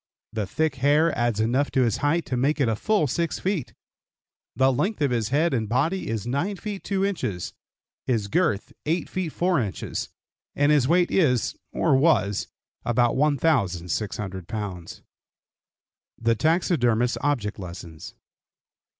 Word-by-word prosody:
The 110 -3 -2
thick 155 - -1
hair 150 +5 +3
adds 120 -3 0
enough 125 +6 +1
to 130 - +3
his 115 -4 +1
height 155 +4 +1
to 130 - -2
make 140 +5 +1
it 115 -5 +2
full 215 -6 +2
6 165 +5 -1
feet. 185 -8 -2 0.8
The 130 +2 +3
length 195 - -1
of 145 -3 +1
his 115 -3 0
head 150 +4 +2
and 110 -4 -1
body 150 +11 0
is 110 -2 -3
9 140 +12 -1
feet 200 +1 -6
2 195 -1 0
inches, 125 - -3 0.5
his 110 -5 0
girth 105 0 0
8 165 +3 0
feet 185 -4 -3
4 180 0 +1
inches 105 -6 -3 0.5
and 145 +1 +3
his 145 -4 +4
weight 175 +3 +3
is, 130 - +2 0.2
or - - +2
was, 130 - +2 0.4
about 120 0 +2
1,600 100 - 0
pounds. 95 -6 -6 1.1
THE 115 0 +2
TAXIDERMIST'S 125 -5 +1
OBJECT 125 -8 -1
LESSONS. 85 -3 -9
130 Hz, 140 wpm, -25 LUFS, 110-160 Hz, 1.1 s, his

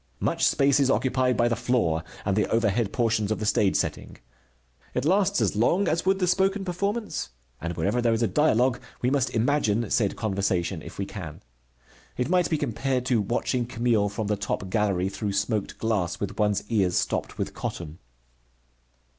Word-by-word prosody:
Much - - -1
space 140 0 +3
is 135 -2 +3
occupied 130 -1 +1
by 120 - +3
the 120 - +1
floor 95 -10 0 0.2
and 95 -1 +1
the 105 - +2
overhead 115 -1 +1
portions 110 -3 0
of 110 - 0
the 110 - -4
stage 105 -2 +2
setting. - - -2 0.8
It 125 - 0
lasts 200 +3 +3
as - - +1
long 170 - +2
as 165 +3 0
would 190 0 +4
the 185 - +1
spoken 195 +2 +1
performance, 200 - -2 0.3
and 85 +1 -3
wherever 100 +9 0
there 120 -1 +2
is 115 +1 +1
a - - +3
dialogue 125 -4 +2 0.2
we 125 - +2
must 140 -3 +1
imagine 115 -3 +1
said 105 -4 +1
conversation 95 -4 -1
if - - -10
we 100 - -2
can. 85 -7 -8 0.7
It 125 +3 -1
might 180 -1 +2
be 160 - +1
compared 130 -1 -1
to 125 -4 +2
watching 120 +3 -1
Camille 115 -4 +1
from 105 +2 -4
the 105 +1 0
top 100 -1 -4
gallery 100 -4 +1
through 100 +1 -3
smoked 100 +1 -1
glass, 105 -6 -1
with 100 +2 -4
one's 105 -2 +1
ears 95 -6 +2
stopped - - -2
with - - -3
cotton. 80 -1 -6
115 Hz, 180 wpm, -26 LUFS, 100-135 Hz, 0.8 s, would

